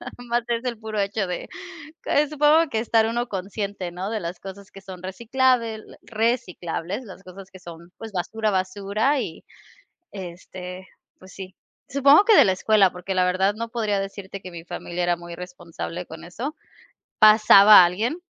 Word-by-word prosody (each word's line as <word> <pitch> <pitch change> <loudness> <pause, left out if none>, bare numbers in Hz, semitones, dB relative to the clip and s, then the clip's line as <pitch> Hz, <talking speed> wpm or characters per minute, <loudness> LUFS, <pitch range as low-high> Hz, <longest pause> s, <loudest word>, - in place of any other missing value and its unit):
nada - - -9 0.2
más 240 0 +1
es 235 +1 -2
el 245 -2 -3
puro 220 -1 -4
hecho 200 0 -1
de 180 - -5 0.6
que 295 0 +2
supongo 305 +2 +3
que 220 - -1
estar 225 -1 +2
uno 240 +2 -2
consciente, 195 -1 -5
¿no?, 180 +3 -5
de 220 - -3
las 170 0 -6
cosas 195 +1 -11
que 195 - -13
son 190 -2 -11
reciclables 230 +3 0 0.2
reciclables, 210 -4 -3
las 195 -2 -12
cosas 190 +1 -12
que 190 - -13
son, 170 -1 -12
pues, 225 -2 -9
basura, 215 +4 -2
basura, 200 +8 0
y, 165 -9 -7 0.7
este, 185 0 -9 0.3
pues 185 0 -15
sí. 190 -1 -10 0.3
Supongo 280 +7 +5
que 440 -1 +6
de - - +7
la 190 - +2
escuela, 195 -1 +3
porque 180 +2 -5
la 185 -1 +2
verdad 190 +2 +1
no 230 +2 -6
podría 215 -4 -1
decirte 195 0 -7
que 185 - -9
mi 170 -1 -10
familia 175 0 -5
era 175 0 +1
muy 170 0 -9
responsable 180 -1 -7
con 160 +1 -11
eso. 245 - -6 0.6
Pasaba 215 -2 +8
alguien, 220 - -1
195 Hz, 175 wpm, -23 LUFS, 180-225 Hz, 0.7 s, Pasaba